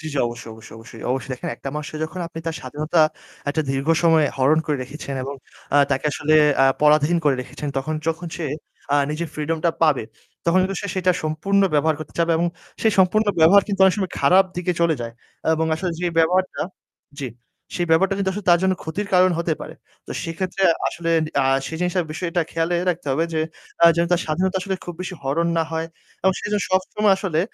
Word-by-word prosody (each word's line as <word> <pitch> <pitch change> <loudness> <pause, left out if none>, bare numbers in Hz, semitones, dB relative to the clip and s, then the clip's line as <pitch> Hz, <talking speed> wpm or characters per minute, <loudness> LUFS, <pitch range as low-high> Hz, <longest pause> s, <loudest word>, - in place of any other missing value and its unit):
জি, - - -13
জি, - - -4
অবশ্যই, 120 -1 -7
অবশ্যই, 110 0 -13
অবশ্যই। 115 0 -12
অবশ্যই, 135 +1 -2
দেখেন 125 - -5
একটা - - -6
মানুষকে 150 0 -5
যখন 170 +3 -7
আপনি 165 -1 -9
তার 165 - -1
স্বাধীনতা 150 +5 -1 0.5
একটা 155 +2 0
দীর্ঘ 135 +3 -2
সময়ে 160 -3 +5
হরণ 140 +4 +3
করে 150 -2 0
রেখেছেন 140 +1 -7
এবং 140 +1 -5 0.4
আ - - +6
তাকে 135 +1 0
আসলে 155 +2 +1 0.3
আ - - +7 0.2
পরাধীন 150 +3 +4
করে 145 -2 +4
রেখেছেন 145 +3 -6
তখন 155 +4 -3
যখন 165 +2 -2
সে 170 - -4 0.5
আ - - +5
নিজের 165 +2 -3
freedom-টা 160 +2 0
পাবে 150 -6 +3 0.4
তখন 170 +2 +4
কিন্তু 190 0 -2
সে 200 - -4
সেটা 185 0 +3
সম্পূর্ণ 155 +6 +1
ব্যবহার 155 +2 +3
করতে 155 - -9
চাবে 170 0 +2
এবং 175 - +2 0.4
সেই 220 -2 +4
সম্পূর্ণ 210 +4 +4
ব্যবহার 185 +6 +7
কিন্তু 200 -2 -2
অনেক 190 - +5
সময় 190 -3 -2
খারাপ 190 +1 +6
দিকে 180 0 0
চলে 170 -1 +3
যায় 115 -1 -5 0.4
এবং 160 0 0
আসলে 175 +3 -2
যে 180 - 0
ব্যবহারটা 180 +3 +2 0.6
জি, 135 - -3 0.5
সেই 175 -1 -1
ব্যবহারটা 190 +4 +4
কিন্তু 195 -1 0
আসলে 205 0 -6
তার 175 - +6
জন্য 190 0 +3
ক্ষতির 175 +6 -4
কারণ 185 0 +5
হতে 170 -1 0
পারে। - - -8 0.3
তো - - -12
সেক্ষেত্রে 185 +3 -3 0.3
আসলে 165 -1 -3 0.3
আ - - +1 0.2
সে - - -6
জিনিসটার 180 -1 0
বিষয়টা 170 +2 -1
খেয়ালে 165 +1 0
রাখতে 175 -2 -6
হবে 160 +5 +1
যে 160 - +1 0.4
আ - - +9
যেন 170 - +3
তার 175 - +3
স্বাধীনতা 185 +5 0
আসলে 190 +1 -2
খুব 175 - -6
বেশি 185 0 -5
হরণ 155 +5 0
না - - +3
হয় 160 0 -2 0.4
এবং 190 +1 +4
সে - - -4
যেন 210 - +1
সবসময় 195 +2 +2
আসলে 185 -5 -1
165 Hz, 205 wpm, -22 LUFS, 150-185 Hz, 0.6 s, আ